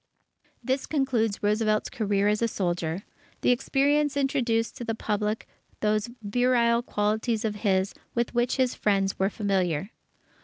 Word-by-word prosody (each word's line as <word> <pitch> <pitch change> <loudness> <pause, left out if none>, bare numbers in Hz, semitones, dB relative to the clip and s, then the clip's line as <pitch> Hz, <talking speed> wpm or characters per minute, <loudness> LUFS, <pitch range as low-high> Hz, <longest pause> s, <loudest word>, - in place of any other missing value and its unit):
This 265 +1 -1
concluded 250 -8 +1
Roosevelt's 215 +1 +2
career 205 -2 +1
as 210 +1 +1
a 230 - +3
soldier. 175 -3 -2 0.4
The - - +4
experience 285 +3 +2
introduced 245 -5 +1
to - - -5
the 225 -1 -2
Public 210 0 -2 0.3
those 215 +1 +1
virile 235 +2 +2
qualities 220 +1 -1
of 210 -1 -2
his, 195 -2 +1 0.2
with 235 0 0
which 240 0 +1
his 255 -2 +2
friends 195 -2 0
were 190 +1 +2
familiar. 195 -3 -1
220 Hz, 140 wpm, -27 LUFS, 205-245 Hz, 0.4 s, The